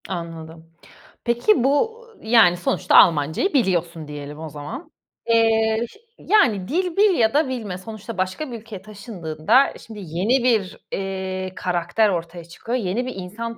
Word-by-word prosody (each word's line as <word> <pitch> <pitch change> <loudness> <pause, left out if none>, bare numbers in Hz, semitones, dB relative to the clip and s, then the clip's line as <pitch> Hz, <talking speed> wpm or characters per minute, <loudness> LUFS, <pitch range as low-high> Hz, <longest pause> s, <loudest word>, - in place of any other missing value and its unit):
Anladım. 165 -2 -7 0.6
Peki, 240 - +2
bu, 445 - +1 0.2
yani, 220 -6 +5
sonuçta 175 - 0
Almancayı 160 - +4
biliyorsun 175 - 0
diyelim 150 0 -8
o 160 0 -6
zaman. 230 - -8 0.4
Eee, 225 0 +3 0.3
yani, 225 - +2
dil 355 - -1
bil 405 -2 +5
ya 225 0 +3
da 295 0 +3
bilme 220 -8 -4
sonuçta 215 +3 -9
başka 190 +10 -3
bir 235 - -6
ülkeye 215 -3 -10
taşındığında 200 - 0
şimdi 220 -2 -9
yeni 195 +9 0
bir, 220 -7 +1
eee, 190 -1 -4
karakter 180 +5 0
ortaya 170 -2 -4
çıkıyor. 225 +8 -4
Yeni 220 +2 -2
bir 255 - -6
insan 220 +5 -6
205 Hz, 140 wpm, -22 LUFS, 175-240 Hz, 0.6 s, yani